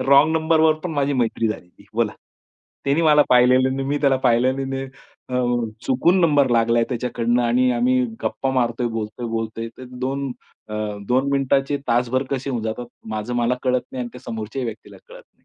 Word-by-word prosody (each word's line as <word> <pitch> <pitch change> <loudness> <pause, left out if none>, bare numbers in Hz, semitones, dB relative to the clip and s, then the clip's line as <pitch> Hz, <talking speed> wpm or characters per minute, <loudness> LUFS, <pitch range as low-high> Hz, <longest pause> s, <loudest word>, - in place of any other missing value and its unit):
Wrong 140 +4 +5
नंबरवर 160 0 +3
पण 180 - -2
माझी 145 -1 0
मैत्री 115 -3 0
झालेली 100 -2 -8
बोला. 115 -2 +1 0.7
त्यांनी 140 +4 +2
मला 150 -2 +6
पाहिलेलं 130 +1 +4
नाही, 135 0 -2
मी 145 +1 0
त्याला 140 -2 +3
पाहिलं 130 +3 +2
नाही. 135 0 -3 0.4
अ, 125 0 0 0.4
चुकून 165 +8 +3
नंबर 145 -6 +3
लागलाय 115 0 +3
त्याच्याकडनं 120 -1 0
आणि 125 +2 +3
आम्ही 125 +1 +2 0.2
गप्पा 115 +4 -1
मारतोय, 120 -1 0
बोलतोय, 115 +1 -4
बोलतोय 115 0 -3
तर 130 - -8 0.2
2 135 +1 -2 0.4
अ, 105 - -6 0.3
2 130 +3 +2
मिनिटाचे 135 +1 +1
तासभर 120 +2 +2
कसे 135 0 -2
होऊन 120 -4 -2
जातात, 110 +2 -4 0.2
माझं 110 +2 -3
मला 120 +1 +2
कळत 125 -1 +2
नाही 130 - -4
आणि 120 - -5
त्या 125 - -11
समोरच्याही 115 +3 -5
व्यक्तीला 110 -1 -8
कळत - - -12
नाही. - - -38
125 Hz, 175 wpm, -22 LUFS, 115-140 Hz, 0.7 s, मला